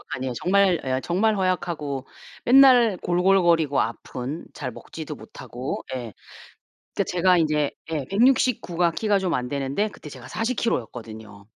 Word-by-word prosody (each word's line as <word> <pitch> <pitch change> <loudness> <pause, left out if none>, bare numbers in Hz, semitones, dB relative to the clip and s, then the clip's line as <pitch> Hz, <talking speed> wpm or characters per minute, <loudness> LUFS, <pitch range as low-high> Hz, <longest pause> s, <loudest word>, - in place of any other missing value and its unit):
아니에요. 130 -1 -4
정말 185 +2 +2
예 130 0 -1
정말 210 +5 +1
허약하고 165 -7 -2 0.4
맨날 250 -5 +6
골골거리고 175 -5 +3
아픈, 125 +6 -5
잘 130 -3 -5
먹지도 155 +5 -8
못하고. 125 +1 -7
예. 120 -5 -5 0.8
그러니까 - - +1
제가 180 0 +3
이제 150 -3 +1 0.2
예 150 -4 -2
169 235 -4 +2
가 170 -1 +3
키가 205 +3 +1
좀 180 -3 -1
안 125 0 -2
되는데 140 +10 -1
그때 155 - -12
제가 130 -3 -11
40 225 - -2
킬로였거든요. 110 - -4
165 Hz, 295 characters per minute, -24 LUFS, 130-195 Hz, 0.8 s, 맨날